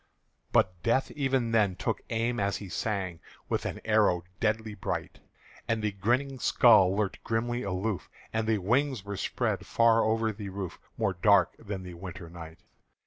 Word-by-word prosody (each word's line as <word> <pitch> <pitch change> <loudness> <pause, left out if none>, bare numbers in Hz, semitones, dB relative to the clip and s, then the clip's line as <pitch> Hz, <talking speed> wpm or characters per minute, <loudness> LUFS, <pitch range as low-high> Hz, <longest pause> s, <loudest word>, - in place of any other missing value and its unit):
But 90 -2 +2
death 130 +3 +1
even 135 -5 0
then 105 -5 +3
took - - -2
aim 115 +2 0
as 100 0 0
he 100 - -8
sang 95 -4 -2 0.3
With - - -1
an - - -5
arrow 105 -5 +3 0.2
deadly 110 0 0
bright; 100 - -4 0.5
And 115 -1 0
the 105 - +1
grinning 125 +7 0
skull 95 -8 +5
lurked 105 -3 -2
grimly 120 +2 -1
aloof, 100 0 -2 0.2
And 110 0 0
the 110 -1 +3
wings 120 +3 0
were 100 0 -4
spread - - -1
far 115 -1 +4
over 110 0 +1
the 100 -1 -7
roof 95 -2 -6 0.2
More 105 -4 +1
dark 95 -1 +4
than 100 -3 -5
the 90 -1 -8
winter 90 -1 -8
night. 80 -1 -10
105 Hz, 165 wpm, -29 LUFS, 95-115 Hz, 0.5 s, skull